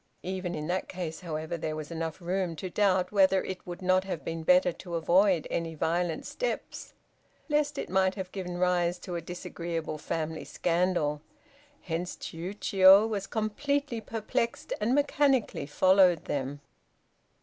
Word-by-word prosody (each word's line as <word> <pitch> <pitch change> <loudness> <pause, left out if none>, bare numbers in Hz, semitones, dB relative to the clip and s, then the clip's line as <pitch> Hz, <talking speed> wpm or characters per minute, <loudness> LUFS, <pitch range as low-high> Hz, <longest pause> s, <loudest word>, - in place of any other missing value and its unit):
Even 185 -1 -3
in 150 -1 -4
that 180 +3 -1
case, 170 -4 -5
however, 160 -1 -4
there 155 -1 -3
was 155 +1 -6
enough 165 -1 -4
room 180 -1 -1
to 180 +3 -6
doubt 190 -3 +2
whether 195 -2 +4
it 185 -1 -6
would 175 +1 -7
not 185 +1 +3
have 185 -4 -5
been 165 0 -3
better 180 +2 +4
to 170 0 -7
avoid 175 +1 +3
any 165 -1 -2
violent 170 +2 -1
steps - - -4 0.6
lest 295 -1 +1
it - - -3
might 190 0 +2
have 190 -2 -5
given 180 -2 -5
rise 175 -1 +2
to 175 0 -6
a 170 - -2
disagreeable 170 -2 -5
family 160 +1 -3
scandal, 170 -4 0 0.6
hence 175 +1 -3
Chiûjiô 190 +3 +4
was 205 -3 -3
completely 250 +3 -1
perplexed 225 +1 -2
and 235 +5 +2
mechanically 280 - +2
followed 185 +1 +4
them. 140 0 -3
180 Hz, 150 wpm, -29 LUFS, 165-195 Hz, 0.6 s, whether